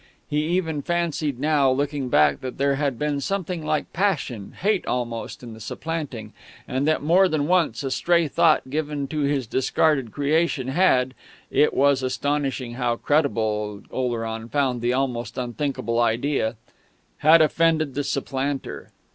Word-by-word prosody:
He 150 0 0
even 165 -4 -1
fancied 160 -5 -1
now, 145 -2 +3
looking 140 0 -1
back, 75 -9 +3
that 130 -1 -6
there 140 0 +2
had 140 -3 -1
been 145 0 -1
something 180 -2 -3
like 155 -1 -2
passion, 155 - -1
hate 200 0 +1
almost, 120 -1 -3
in 115 -2 -8
the 110 - -11
supplanting, 135 -4 -5 0.3
and 130 +3 -1
that 155 -2 +1
more 180 +5 +5
than 155 -3 0
once 175 -3 +1
a 135 - -2
stray 170 +3 +2
thought 155 -3 +2
given 145 -2 -2
to 155 - -3
his 140 -2 0
discarded 135 +1 +1
creation 145 -1 0
had 130 -5 +3 0.4
(it 150 - +4
was 140 -1 +3
astonishing 130 -1 -2
how 120 -1 0
credible 110 -8 0
Oleron 115 -2 -3
found 130 -4 0
the 120 +1 +1
almost 120 -4 -2
unthinkable 120 -2 -2
idea) 120 0 +1 0.6
had 160 +2 +6
offended 155 -2 +2
the 145 - -2
supplanter. 135 0 -3
140 Hz, 145 wpm, -24 LUFS, 125-155 Hz, 0.6 s, had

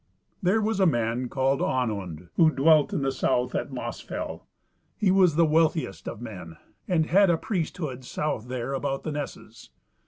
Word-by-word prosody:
There 205 +4 +2
was 220 -1 0
a 190 - +5
man 120 -2 0
called 135 +1 +1
Onund, 95 -9 -2
who 165 -2 +5
dwelt 155 +1 +4
in 140 - -1
the 135 - +1
south 125 -1 0
at - - -2
Mossfell: - - -6 0.5
he 195 -3 +2
was 185 -4 +4
the 165 +1 +5
wealthiest 155 - +1
of - - -5
men, 90 -8 -8 0.3
and 165 -4 +2
had 195 +3 +4
a 170 - +3
priesthood 160 - -3
south 125 -3 -3
there 125 +1 -3
about 135 0 -2
the 155 - -3
nesses. 135 -5 -7
140 Hz, 165 wpm, -26 LUFS, 125-165 Hz, 0.5 s, a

